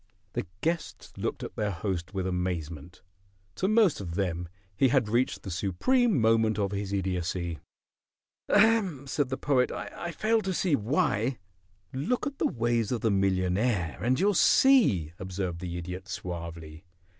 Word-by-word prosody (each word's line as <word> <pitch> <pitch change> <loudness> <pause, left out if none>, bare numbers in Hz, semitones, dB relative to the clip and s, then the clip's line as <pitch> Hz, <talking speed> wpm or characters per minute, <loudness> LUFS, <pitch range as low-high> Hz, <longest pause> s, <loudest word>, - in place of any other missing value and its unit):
The - - -3
guests 165 +1 -3
looked - - -3
at - - -7
their 105 -1 -1
host 95 -1 -3
with 95 -2 -2
amazement. 90 -3 -4 0.5
To 190 - -1
most 215 - +3
of 85 -3 -5
them 90 -3 -2 0.3
he 135 - +4
had 125 -3 +2
reached 120 +4 0
the 95 - -6
supreme 160 - +2
moment 110 -1 +3
of 100 -2 0
his 100 -1 -3
idiocy. 90 -3 -2 0.9
"Ahem!" 205 - +3
said 140 0 -1
the 130 - -2
Poet. 130 -3 +2
"I 175 - -6
fail 220 +6 +1
to 190 -2 -2
see 170 -5 +2
why." 115 0 0 0.6
"Look 220 - -1
at 285 -2 -5
the - - +3
ways 115 -2 0
of 120 - -1
the 110 - +2
millionaire 95 -1 +1
and 125 +4 +1
you'll 205 +3 +3
see," 175 - +4
observed 95 -2 -4
the 90 -1 -5
Idiot, 90 +2 -6
suavely. 85 -3 -6
105 Hz, 155 wpm, -28 LUFS, 90-140 Hz, 0.9 s, he